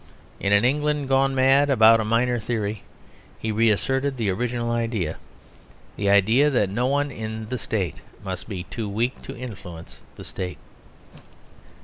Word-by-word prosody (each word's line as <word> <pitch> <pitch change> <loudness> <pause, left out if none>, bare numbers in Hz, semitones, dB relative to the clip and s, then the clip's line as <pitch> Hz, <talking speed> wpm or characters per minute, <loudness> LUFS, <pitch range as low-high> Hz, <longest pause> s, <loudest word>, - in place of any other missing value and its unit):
In 100 - -1
an 100 +3 +5
England 150 +1 0
gone 135 0 +3
mad 135 +2 +4
about 115 -3 +6
a - - 0
minor 120 +3 +1
theory 105 -3 -3 0.6
he 110 - -3
reasserted 120 +6 +1
the 110 -5 0
original 120 +3 -2
idea 115 -9 -1 0.8
the 100 -1 0
idea 110 +9 +4
that 105 -8 +1
no 120 +5 0
one 145 +1 0
in 110 -2 -6
the 125 - -3
State 100 -6 -2 0.3
must 95 +1 -5
be 95 -4 -4
too 110 +2 -5
weak 115 +6 -2
to - - -9
influence 90 -9 -9
the - - -10
State. 90 -1 -6
115 Hz, 150 wpm, -24 LUFS, 100-130 Hz, 0.8 s, about